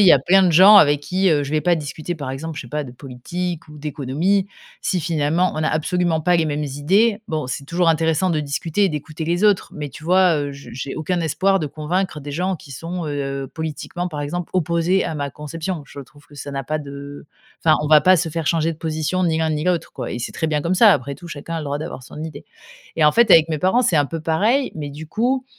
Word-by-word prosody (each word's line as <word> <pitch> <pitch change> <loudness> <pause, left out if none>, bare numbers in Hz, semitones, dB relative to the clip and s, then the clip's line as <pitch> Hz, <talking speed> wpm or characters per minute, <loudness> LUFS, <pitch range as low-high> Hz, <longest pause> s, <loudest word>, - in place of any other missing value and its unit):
il - - +6
y - - +9
a 140 - +6
plein 190 +8 +4
de 180 - +4
gens 195 +6 +9
avec 145 -6 +5
qui, 185 +4 +1
heu, 145 -2 +2
je 140 - -6
vais 155 0 0
pas 175 -1 +3
discuter 155 +2 -5
par 140 -5 -5
exemple, 155 +4 -6
je - - -3
sais 120 - -12
pas 150 +1 -3
de 125 - -10
politique 160 +7 -5
ou 150 - -12
d'économie, 155 +7 0 0.4
si 180 - 0
finalement, 165 +2 +1
on - - -1
n'a 155 - +1
absolument 165 +1 0
pas 175 +2 +3
les 165 - +2
mêmes 150 -1 -2
idées. 195 +11 +1
Bon, 155 -5 -3
c'est 130 +2 -5
toujours 170 +4 +1
intéressant 160 +2 +2
de 155 -3 0
discuter 155 +7 -1
et - - +3
d'écouter 155 +1 -5
les 175 +4 -1
autres, 205 -3 +2
mais 150 -1 -5
tu 155 +3 -12
vois, 180 -1 +4
heu, 145 -1 -3
je 140 0 -12
j'ai 135 +1 -5
aucun 170 +3 -2
espoir 195 +5 +1
de 155 - -2
convaincre 155 +3 -2
des 145 0 -7
gens 185 +5 -1
qui 150 - -12
sont, 165 +5 -5
heu, 140 -2 -3
politiquement 160 +4 -5
par 150 -4 -6
exemple 165 +4 -4
opposés 170 +1 +1
à - - -3
ma 140 -2 -3
conception. 160 +2 -5
Je 140 - -10
trouve 145 +1 -16
que 145 - -18
ça 145 0 -7
n'a 135 -1 -4
pas 155 +4 -2
de 140 0 -9 0.4
enfin, 155 -1 +5
on 150 - -2
va 150 -1 +7
pas 185 +2 +6
se 165 0 -1
faire 160 -1 -4
changer 165 -1 +1
de - - -20
position 160 +3 -1
ni 160 -2 +1
l'un 160 0 +1
ni 150 0 -1
l'autre, 180 -3 0
quoi - - -5
et 120 - -4
c'est 120 - -5
très 160 - -2
bien 150 -1 0
comme 170 +4 0
ça, 205 +1 +7
après 140 +3 -2
tout, 175 +3 -12
chacun 145 -3 -8
a - - -1
le - - -6
droit 145 0 -2
d'avoir 155 -4 -6
son 150 - -10
idée 150 -3 -8 0.5
et 155 - +3
en 150 - +6
fait, 235 -3 +4
avec 165 -1 +7
mes 155 - -2
parents, 190 - +2
c'est 185 - +1
un 145 - +4
peu 165 +3 -5
pareil, 215 - +1
mais 145 -3 -5
du 155 +3 -9
coup, 250 +9 0
160 Hz, 265 wpm, -21 LUFS, 145-180 Hz, 0.5 s, y